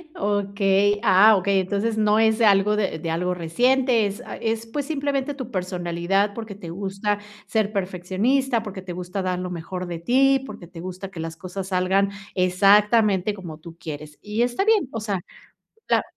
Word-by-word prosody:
Okey. 200 Hz, 0 st, +1 dB
Ah, 205 Hz, +3 st, +6 dB
okey, 195 Hz, +1 st, +2 dB
entonces 205 Hz, +4 st, -1 dB
no 215 Hz, 0 st, +3 dB
es 220 Hz, +1 st, +3 dB
algo 205 Hz, -1 st, +4 dB
de 195 Hz, -6 st, -1 dB
de 165 Hz, +1 st, -4 dB
algo 180 Hz, +2 st, 0 dB
reciente, 240 Hz, +7 st, +2 dB
es 205 Hz, +4 st, -4 dB
a -, -, -8 dB
es, 225 Hz, 0 st, -2 dB
pues, 280 Hz, +5 st, -3 dB
simplemente 285 Hz, -2 st, -1 dB
tu 260 Hz, -3 st, -7 dB
personalidad, 185 Hz, +1 st, -1 dB
porque 220 Hz, -2 st, -7 dB
te 180 Hz, -4 st, -9 dB
gusta 195 Hz, +3 st, -2 dB, 0.3 s
ser 215 Hz, -2 st, 0 dB
perfeccionista, 200 Hz, +7 st, 0 dB
porque 200 Hz, -3 st, -7 dB
te 185 Hz, -, -8 dB
gusta 180 Hz, +2 st, -4 dB
dar 185 Hz, -1 st, -1 dB
lo 180 Hz, 0 st, -4 dB
mejor 180 Hz, +1 st, -5 dB
de 170 Hz, -1 st, -5 dB
ti, 270 Hz, +7 st, +3 dB
porque 175 Hz, -9 st, -10 dB
te 170 Hz, -1 st, -10 dB
gusta 185 Hz, +1 st, -7 dB
que 165 Hz, -4 st, -7 dB
las 165 Hz, 0 st, -6 dB
cosas 185 Hz, +1 st, -6 dB
salgan 190 Hz, +1 st, +2 dB, 0.3 s
exactamente 200 Hz, +2 st, +4 dB
como 175 Hz, -6 st, -8 dB
tú 165 Hz, +1 st, -12 dB
quieres. 150 Hz, -2 st, -8 dB
Y 210 Hz, +2 st, -2 dB
está 245 Hz, +11 st, +1 dB
bien, 435 Hz, -, +3 dB
o 225 Hz, -, -3 dB
sea, 205 Hz, -4 st, -2 dB, 0.7 s
la -, -, +3 dB
200 Hz, 180 wpm, -23 LUFS, 180-220 Hz, 0.7 s, Ah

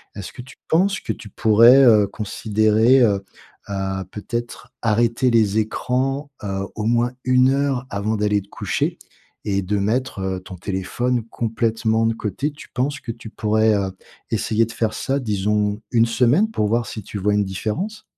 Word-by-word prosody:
Est-ce 100 Hz, -3 st, -7 dB
que -, -, -9 dB
tu 130 Hz, -, -14 dB
penses 190 Hz, +4 st, +2 dB
que -, -, -4 dB
tu 110 Hz, -, -12 dB
pourrais, 115 Hz, +6 st, +6 dB
heu, 110 Hz, -4 st, +6 dB
considérer, 110 Hz, +4 st, +2 dB
heu 100 Hz, -4 st, +2 dB, 0.5 s
heu, 95 Hz, -1 st, -2 dB
peut-être 120 Hz, +3 st, -6 dB
arrêter 115 Hz, +3 st, +2 dB
les 110 Hz, -3 st, +3 dB
écrans, 130 Hz, +6 st, -1 dB
heu, 95 Hz, -1 st, -3 dB
au 105 Hz, -, -4 dB
moins 120 Hz, +1 st, +2 dB
1 130 Hz, +1 st, +2 dB
avant 105 Hz, +2 st, -2 dB
d'aller 105 Hz, 0 st, +1 dB
te 100 Hz, -, -24 dB
coucher -, -, -2 dB, 0.5 s
et 100 Hz, -1 st, 0 dB
de 100 Hz, +3 st, -1 dB
mettre, 110 Hz, +4 st, -1 dB
heu, 95 Hz, -1 st, -2 dB
ton 95 Hz, 0 st, -10 dB
téléphone 110 Hz, +7 st, -2 dB
complètement 115 Hz, 0 st, 0 dB
de 115 Hz, -, +2 dB
côté? 115 Hz, +7 st, -3 dB
Tu 145 Hz, -, -14 dB
penses 140 Hz, +3 st, -1 dB
que 115 Hz, -, -5 dB
tu 115 Hz, -1 st, -10 dB
pourrais, 110 Hz, 0 st, +2 dB
heu, 100 Hz, -1 st, -1 dB, 0.4 s
essayer 110 Hz, 0 st, +1 dB
de -, -, -9 dB
faire 110 Hz, -2 st, -1 dB
ça, 135 Hz, +1 st, -1 dB
disons 105 Hz, -2 st, 0 dB
1 120 Hz, -, +2 dB
une -, -, +6 dB
semaine 125 Hz, -, +2 dB
pour 105 Hz, -, 0 dB
voir 115 Hz, +2 st, +1 dB
si 110 Hz, -, -6 dB
tu 105 Hz, -, -7 dB
vois 105 Hz, +2 st, +1 dB
une 105 Hz, -, +2 dB
différence? 140 Hz, -, -4 dB
110 Hz, 175 wpm, -21 LUFS, 105-125 Hz, 0.5 s, pourrais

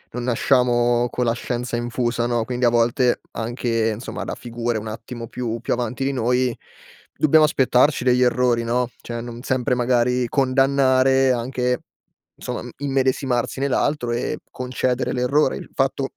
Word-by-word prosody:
non 125 Hz, -, -3 dB
nasciamo 120 Hz, -1 st, +2 dB
con 125 Hz, -, -1 dB
la 115 Hz, -, +2 dB
scienza 120 Hz, 0 st, -3 dB
infusa 120 Hz, 0 st, -1 dB
no, 120 Hz, -2 st, 0 dB
quindi 125 Hz, +1 st, -3 dB
a 120 Hz, -, +6 dB
volte 120 Hz, +1 st, +2 dB
anche 115 Hz, -1 st, -1 dB
insomma 115 Hz, -, -6 dB
da -, -, -5 dB
figure 120 Hz, -1 st, -3 dB
un 110 Hz, +1 st, -6 dB
attimo 115 Hz, +2 st, -7 dB
più 115 Hz, -1 st, -4 dB
più 120 Hz, -, -1 dB
avanti 125 Hz, +2 st, -2 dB
di 140 Hz, -, 0 dB
noi 125 Hz, 0 st, 0 dB, 0.6 s
dobbiamo 155 Hz, +1 st, +5 dB
aspettarci 135 Hz, -2 st, +3 dB
degli 125 Hz, 0 st, +3 dB
errori 125 Hz, -1 st, +2 dB
no, 120 Hz, +1 st, 0 dB
cioè 120 Hz, 0 st, -5 dB
non 120 Hz, 0 st, -7 dB
sempre 130 Hz, 0 st, 0 dB
magari 125 Hz, 0 st, +1 dB
condannare 135 Hz, 0 st, +3 dB
anche 125 Hz, 0 st, -1 dB, 0.6 s
insomma -, -, -5 dB, 0.2 s
immedesimarsi 130 Hz, -2 st, 0 dB
nell'altro 140 Hz, -2 st, 0 dB
e 120 Hz, -, -2 dB
concedere 125 Hz, 0 st, -2 dB
l'errore. 130 Hz, +3 st, +1 dB
Il -, -, -10 dB
fatto 135 Hz, 0 st, -1 dB
125 Hz, 150 wpm, -22 LUFS, 120-130 Hz, 0.6 s, a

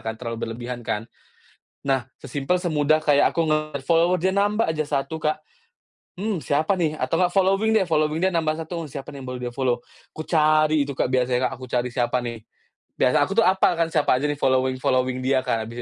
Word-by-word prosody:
kan 110 Hz, 0 st, -3 dB
terlalu 115 Hz, -1 st, -6 dB
berlebihan 120 Hz, +1 st, -6 dB
kan, 110 Hz, -1 st, -3 dB, 0.8 s
nah 135 Hz, -2 st, 0 dB, 0.2 s
sesimple 145 Hz, +6 st, -1 dB
semudah 155 Hz, -2 st, +2 dB
kayak 145 Hz, -1 st, +3 dB
aku -, -, 0 dB
ngelihat 155 Hz, 0 st, -1 dB
follower 170 Hz, +2 st, +3 dB
dia 190 Hz, +1 st, +2 dB
nambah 205 Hz, +3 st, +2 dB
aja 155 Hz, -1 st, -1 dB
1 145 Hz, +2 st, -2 dB
Kak, 155 Hz, +1 st, 0 dB, 0.8 s
mmm, 210 Hz, -2 st, -1 dB
siapa 155 Hz, +7 st, +1 dB
nih 160 Hz, -3 st, 0 dB
atau -, -, 0 dB
gak 180 Hz, -1 st, +2 dB
following 195 Hz, +3 st, +2 dB
deh 205 Hz, -4 st, +3 dB
following 155 Hz, 0 st, +1 dB
dia 190 Hz, 0 st, +2 dB
nambah 160 Hz, -2 st, +1 dB
1 165 Hz, 0 st, -5 dB
siapa 140 Hz, 0 st, -7 dB
nih 140 Hz, -, -8 dB
baru 125 Hz, 0 st, -5 dB
dia -, -, -15 dB
follow 125 Hz, -3 st, 0 dB, 0.3 s
kucari 155 Hz, -1 st, +2 dB
itu 140 Hz, -, -5 dB
Kak -, -, 0 dB
biasanya 125 Hz, -1 st, +1 dB
Kak -, -, -13 dB
aku 130 Hz, -, -8 dB
cari 125 Hz, 0 st, 0 dB
siapa 125 Hz, 0 st, 0 dB
nih, 120 Hz, -1 st, -5 dB, 0.6 s
biasa 125 Hz, -, +3 dB
aku 195 Hz, -, -2 dB
tuh -, -, +3 dB
hafal 190 Hz, -1 st, +3 dB
kan 165 Hz, -, +2 dB
siapa 150 Hz, -4 st, +2 dB
aja 145 Hz, -, -2 dB
nih 145 Hz, -, -2 dB
following 130 Hz, -1 st, +1 dB
following 130 Hz, 0 st, +1 dB
dia 130 Hz, 0 st, +2 dB
Kak 115 Hz, -3 st, 0 dB
habis 115 Hz, +2 st, -7 dB
150 Hz, 205 wpm, -23 LUFS, 130-165 Hz, 0.8 s, kayak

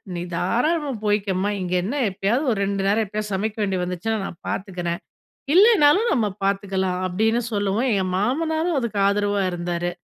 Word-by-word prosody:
நீ 170 Hz, -, -3 dB
தாராளமா 280 Hz, -, 0 dB
போய்க்கமா. 200 Hz, -1 st, +1 dB
இங்க 180 Hz, 0 st, -3 dB
என்ன 225 Hz, +10 st, -3 dB
எப்பயாவது 200 Hz, +9 st, 0 dB
ஒரு 215 Hz, -, -1 dB
2 195 Hz, 0 st, -1 dB
நேரம் 215 Hz, +3 st, +2 dB
எப்பயாவது 210 Hz, +1 st, -4 dB
சமைக்க 210 Hz, +3 st, -2 dB
வேண்டியது 190 Hz, -3 st, 0 dB
வந்துச்சுன்னா, 180 Hz, +5 st, -2 dB
நான் 170 Hz, -, -7 dB
பார்த்துக்குறேன், 175 Hz, -3 st, -3 dB, 0.6 s
இல்லனாலும் 405 Hz, 0 st, +6 dB
நம்ம 230 Hz, -5 st, +2 dB, 0.2 s
பார்த்துக்கலாம் 195 Hz, -2 st, 0 dB
அப்டின்னு 220 Hz, +6 st, +1 dB
சொல்லவும். 205 Hz, +4 st, 0 dB
எங்க 195 Hz, -2 st, +1 dB
மாமனாரும் 320 Hz, -, 0 dB
அதுக்கு 235 Hz, -5 st, -2 dB
ஆதரவா 205 Hz, 0 st, +1 dB
இருந்தாரு. 175 Hz, 0 st, -2 dB
205 Hz, 150 wpm, -23 LUFS, 190-240 Hz, 0.6 s, இல்லனாலும்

